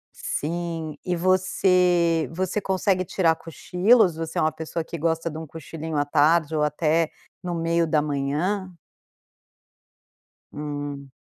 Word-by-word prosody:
Sim, 165 0 -3
e 180 - -1
você 180 -3 +2
você 185 +4 -2
consegue 190 -1 +1
tirar 165 -2 +2
cochilos? 180 +4 +2
Você 160 0 -5
é - - +3
uma 155 - +2
pessoa 160 +1 -4
que 165 - -8
gosta 165 +1 -1
de 160 -1 -4
um 160 - -7
cochilinho 160 +1 -6
à 145 - +2
tarde 155 +2 +3
ou 150 - +1
até 155 +2 +1 0.3
no 175 -1 -3
meio 165 0 +1
da 155 -1 +2
manhã? 150 +7 -1 1.8
Hum. 145 -2 -6
165 Hz, 135 wpm, -24 LUFS, 155-180 Hz, 1.8 s, é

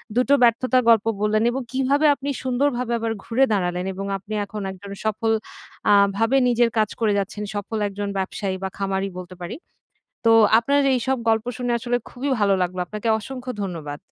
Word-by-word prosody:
২ 250 - +4
টো 285 - +7
ব্যর্থতার 255 +2 +3
গল্প 225 -2 +5 0.2
বললেন 215 +1 +2
এবং 265 +2 -3
কিভাবে 270 +3 +1
আপনি 280 +1 -5
সুন্দরভাবে 250 -1 0
আবার 225 0 -2
ঘুরে 255 +4 +2
দাঁড়ালেন 180 -2 -1
এবং 195 +1 -5
আপনি 200 +3 -9
এখন 210 +1 -7
একজন 195 +1 -10
সফল 220 +1 0 0.6
আ - - +7 0.2
ভাবে 225 +5 +3
নিজের 240 -1 +3
কাজ 215 -1 +2
করে 220 -3 +2
যাচ্ছেন। 200 +1 -4
সফল 205 +2 -3
একজন 205 0 -4
ব্যবসায়ী 190 0 -2
বা 190 - -1
খামারী 195 0 -1
বলতে 185 0 -8
পারি। 175 - -5 0.7
তো 225 - +6 0.3
আপনার 280 +5 +1 0.2
এইসব 260 +2 0
গল্প 225 0 +2
শুনে 245 -1 -2
আসলে 245 +1 0
খুবই 270 +3 -4
ভালো 200 -1 +3
লাগলো। 180 0 -2
আপনাকে 210 +4 -5
অসংখ্য 255 +2 -6
ধন্যবাদ। 155 -6 -5
220 Hz, 180 wpm, -23 LUFS, 195-245 Hz, 0.7 s, টো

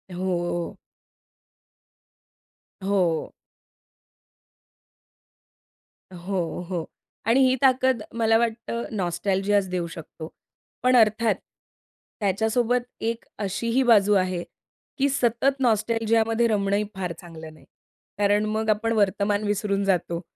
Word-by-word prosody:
हो. 175 -2 -2 2.1
हो. 185 -5 0 2.8
हो, 180 -1 -3
हो 175 -4 -2 0.4
आणि 235 +4 +4
ही 255 - +3
ताकद 260 -2 +3 0.2
मला 225 -1 +4
वाटतं 235 0 -2
नॉस्टॅल्जिया 195 +2 +1
देऊ 180 -2 -2
शकतो. 165 -1 -9 0.5
पण 255 0 +4
अर्थात, 220 -1 +4 0.8
त्याच्यासोबत 220 +4 +1 0.2
एक 230 +1 -3
अशीही 230 +6 0
बाजू 210 -4 +5
आहे 185 -2 +1 0.5
की 280 0 +2
सतत 265 +1 +1
नॉस्टॅल्जियामध्ये 225 0 +2
रमणं 200 -2 +1
ही 210 - +1
फार 185 -2 -3
चांगलं 160 -2 -10
नाही, 155 - -19 0.5
कारण 205 +1 +2
मग 215 +1 -1
आपण 215 +2 +1
वर्तमान 205 0 +1
विसरून 200 -1 0
जातो 175 -3 0
210 Hz, 95 wpm, -24 LUFS, 185-230 Hz, 2.8 s, बाजू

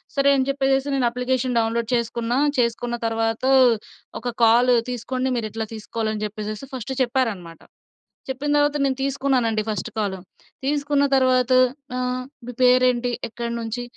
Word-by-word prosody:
సరే 280 0 +3
అని 260 0 0
చెప్పేసేసి 270 0 +1
నేను 250 -3 +2
అప్లికేషన్ 250 0 -1
డౌన్‌లోడ్ 230 +1 -1
చేసుకున్నా. 235 +1 -1 0.2
చేసుకున్న 240 0 0
తర్వాత 225 0 -1 0.8
ఒక 245 - -2 0.2
కాల్ 245 +2 +5 0.2
తీసుకోండి 255 +2 -2
మీరిట్లా 220 -1 -4
తీసుకోవాలి 220 0 -3
అని 215 - -4
జెప్పేసేసి 215 +3 -6
ఫస్ట్ 255 +1 -5
చెప్పారన్నమాట. 220 -10 -2 0.7
చెప్పిన 270 +3 -3
తర్వాత 290 0 +2
నేను 265 -1 0
తీసుకున్నానండి 265 -5 0
ఫస్ట్ 210 0 -3
కాలు. 200 -3 -1 0.5
తీసుకున్న 285 0 +1
తర్వాత 255 -1 +3 0.5
ఆహ్, 255 0 -2 0.2
"మీ 250 - -6
పేరేంటి? 250 -1 +4 0.2
ఎక్కడినుంచి? 235 0 -4
245 Hz, 130 wpm, -22 LUFS, 225-260 Hz, 0.8 s, కాల్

